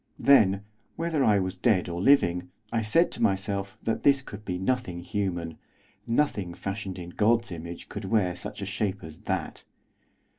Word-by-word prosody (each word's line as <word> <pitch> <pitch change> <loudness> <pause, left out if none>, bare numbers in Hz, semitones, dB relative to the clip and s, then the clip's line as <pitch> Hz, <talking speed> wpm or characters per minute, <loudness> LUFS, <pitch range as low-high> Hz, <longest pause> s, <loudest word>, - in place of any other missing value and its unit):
Then, 100 -8 +5 0.3
whether 165 -4 0
I 105 -4 +5
was 95 -1 -1
dead 95 -1 +2
or 85 0 -3
living, 90 -9 +3 0.2
I 115 - +2
said 165 +11 +3
to - - -4
myself 100 0 0
that 115 - -1
this 140 -1 +4
could 105 -4 -9
be 90 -3 -3
nothing 95 -3 -1
human, 85 -3 -3 0.5
nothing 110 -9 0
fashioned 100 -1 -5
in 90 -1 -7
God's 115 +2 +2
image 85 0 -7
could 105 -1 -6
wear 95 -3 +1
such 100 - -6
a - - -2
shape 100 0 -2
as 80 0 -10
that. - - -2
100 Hz, 165 wpm, -27 LUFS, 90-115 Hz, 0.5 s, Then